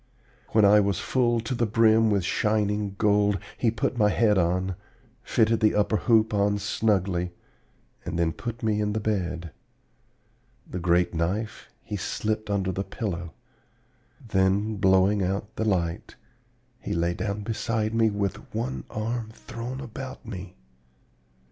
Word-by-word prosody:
When 110 -2 +4
I 105 +1 +7
was 100 -3 +1
full 120 -3 +1
to 115 +3 -3
the 120 -2 0
brim 110 0 +4
with 100 -3 +1
shining 105 -1 0
gold, 105 -1 +3 0.2
he 120 - +1
put 115 +2 -1
my 105 -1 +5
head 105 -1 +3
on, 90 +1 +1 0.5
fitted 115 -1 +2
the 110 -1 +3
upper 105 +1 +2
hoop 110 -2 +3
on 100 0 +2
snugly, 95 -4 0 0.7
and 85 -1 -4
then 85 -1 +2
put 115 0 -6
me 105 -1 +1
in 105 0 0
the 110 - 0
bed. 90 -6 -2 1.2
The 90 - -5
great 90 +1 +2
knife 95 +7 -2
he 105 - -4
slipped 110 +3 -2
under 95 -2 0
the 95 +2 -2
pillow. 85 -7 -4 0.9
Then, 100 +2 +1
blowing 95 +1 +4
out 100 +3 -2
the 110 - -1
light, 85 -5 -1 0.6
he - - -4
lay 85 +1 +1
down 100 +3 -3
beside 110 0 -1
me 115 -1 +3
with 100 -2 -2 0.2
one 120 +4 -3
arm 110 +1 -3
thrown 115 +3 -7
about 130 0 -8
me. 95 -4 -7
105 Hz, 145 wpm, -26 LUFS, 95-110 Hz, 1.2 s, I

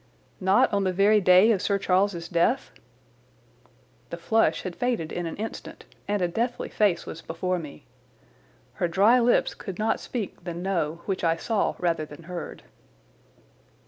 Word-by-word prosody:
"Not 190 +2 +3
on 200 -1 +2
the 185 - +1
very 205 +3 +4
day 185 +4 +6
of 200 -4 +1
Sir 200 - +1
Charles's 185 -2 0
death?" 175 +11 +1 1.4
The - - -6
flush 225 0 +1
had 185 -2 -5
faded 240 -10 -2
in 175 -1 -3
an 165 - -5
instant, 220 +2 -7 0.2
and 205 -2 0
a - - +2
deathly 235 +8 -2
face 200 -5 +1
was 165 - -8
before 180 +3 -2
me. 150 -3 -10 1.0
Her 175 - +3
dry 205 +8 +4
lips 240 0 +2
could 195 -5 -8
not 220 +1 0
speak 215 -7 -6
the 170 -1 -5
"No" 170 -3 -2
which 190 -2 -3
I 165 -1 +3
saw 205 +5 -1
rather 165 -3 -1
than 150 +3 -12
heard. 175 +1 -7
185 Hz, 160 wpm, -26 LUFS, 170-210 Hz, 1.4 s, day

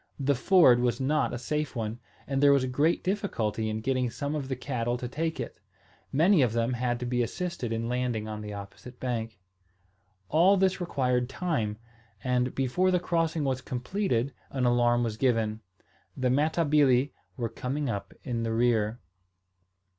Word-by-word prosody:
The 140 +1 +2
ford 140 -2 +5
was 120 +1 +1
not 140 +2 +1
a - - -3
safe 150 +4 -2
one; 115 0 -3 0.3
and 135 0 -1
there 145 0 +7
was 140 -2 +4
great 145 +6 +1
difficulty 115 - -1
in 110 0 -3
getting 130 0 0
some 140 +5 -4
of 145 -3 -3
the 130 - -2
cattle 120 -2 -2
to 125 - -5
take 160 +5 -3
it: - - -6 0.5
many 165 +4 +4
of 120 -4 +2
them 115 +2 0
had 120 0 -1
to - - -2
be 125 0 0
assisted 150 -1 -3
in 115 0 -2
landing 120 -3 -1
on 105 0 -5
the 105 0 -6
opposite 100 +5 -9
bank. 115 -4 -3 0.9
All 175 - +5
this 190 0 +2
required 125 -7 0
time; 135 - -2 0.5
and, 125 0 0
before 135 +8 +1
the 180 -1 +3
crossing 165 -3 0
was 130 -2 -1
completed 125 - -1 0.2
an 130 -2 -1
alarm 120 0 +3
was 110 -2 -2
given. 110 -3 +1 0.6
The 130 -1 +1
Matabili 145 -2 +3 0.2
were 120 - -1
coming 140 +6 -3
up 100 -4 -3
in 120 -2 -2
the 115 -1 -1
rear. 115 -1 +1
125 Hz, 170 wpm, -28 LUFS, 115-150 Hz, 0.9 s, there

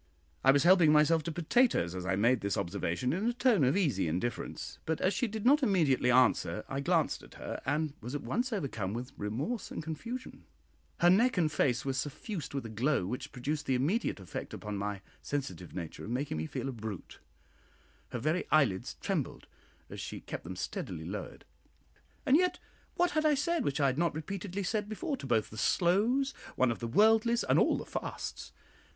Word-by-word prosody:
I 135 - +5
was 140 0 +6
helping 175 -3 +6
myself 155 +2 +5
to 170 - -2
potatoes 170 - +2
as 90 0 -5
I 95 - +2
made 115 +5 +3
this 100 0 -1
observation 90 - -1
in 195 +7 -1
a 240 - +2
tone 240 - +3
of 135 +7 +3
easy 135 - +1
indifference; 90 +10 -3
but 160 0 0
as 185 - +2
she 240 +6 0
did 220 0 -5
not 290 +4 +6
immediately 160 - +3
answer, 125 -3 +3
I 135 - -3
glanced 165 +1 +1
at - - -15
her, - - -6
and 150 +1 0
was 120 +5 -5
at 145 - -4
once 250 +2 -1
overcome 120 - -2
with 125 +2 -5
remorse 135 - -3
and - - -5
confusion; 230 - -6 0.6
her 175 - +7
neck 235 +4 +4
and 160 -4 +2
face 125 -5 +1
were 135 - 0
suffused 150 - -4
with 135 - -3
a - - -3
glow 115 0 +1
which 130 +8 -5
produced 145 +4 -3
the 130 - +2
immediate 150 - 0
effect 95 -4 -6
upon 105 -1 -5
my 100 0 -3 0.2
sensitive 95 - -4
nature 85 -4 -6
of - - -7
making 125 - -2
me 80 +1 -2
feel - - -4
a - - -2
brute; 110 -6 -7 0.9
her - - -4
very 155 +9 0
eyelids 125 -12 +2
trembled - - -2 0.4
as - - -8
she - - -6
kept - - -6
them 90 +3 -6
steadily 80 -2 -5
lowered: 95 +2 -6 0.8
and 270 - +6
yet 360 +1 +2 0.4
what 355 0 +2
had 310 +1 +1
I 305 -1 +4
said 330 +4 0
which 140 - -1
I 140 - +3
had 135 +2 +1
not 170 -2 +1
repeatedly 190 +4 -4
said 210 +2 -1
before 295 +7 -2
to 135 - -7
both 115 -4 +1
the 110 - -7
"slows," 220 - +2 0.2
one 130 -2 +3
of 115 - -4
the 115 - -3
"worldlies," 225 - +4
and - - +4
all - - +3
the - - -6
"fasts"? - - -5
145 Hz, 200 wpm, -31 LUFS, -, 0.9 s, her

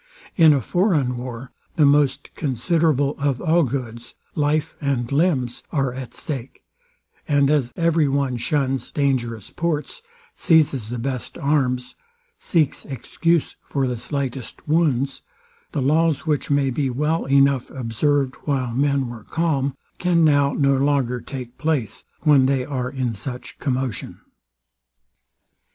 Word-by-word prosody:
In 160 -3 +7
a 140 -2 +3
foreign 150 - +1
war 125 +1 -7 0.2
the 155 - +4
most 145 -2 +2
considerable 145 +1 +1
of 140 -3 0
all 170 0 +3
goods, 120 -4 -4 0.2
life 150 +1 0
and 135 -4 -1
limbs, 140 -6 +1
are 135 -4 0
at 130 -1 -7
stake; 135 -4 -6 0.6
and 145 -1 +3
as 135 -5 +1
every 165 -2 +2
one 135 -2 0
shuns 135 +1 -1
dangerous 120 -7 -1
ports, 170 - -2 0.3
seizes 150 - +2
the 120 - -3
best 125 0 -4
arms, 130 -4 0 0.4
seeks 165 - 0
excuse 155 +5 -1
for 140 -2 -2
the 125 -1 -1
slightest 135 0 -5
wounds, 145 -4 +1 0.5
the 140 - -1
laws, 155 +1 +2
which 150 -3 0
may 140 -2 +2
be 135 +1 0
well 150 +6 0
enough 135 -1 +3
observed 130 +3 0
while 130 -5 -1
men 140 0 +1
were 120 -3 -9
calm, 140 -5 -1 0.2
can 170 -2 +3
now 145 -2 +4
no 140 -2 +2
longer 135 -3 +1
take 125 -2 -8
place, 150 -8 -1 0.2
when 145 -4 +5
they 135 -2 +1
are 130 -3 -3
in 130 -3 -2
such 125 +5 -7
commotion. 130 -4 -3
140 Hz, 135 wpm, -22 LUFS, 125-150 Hz, 0.6 s, In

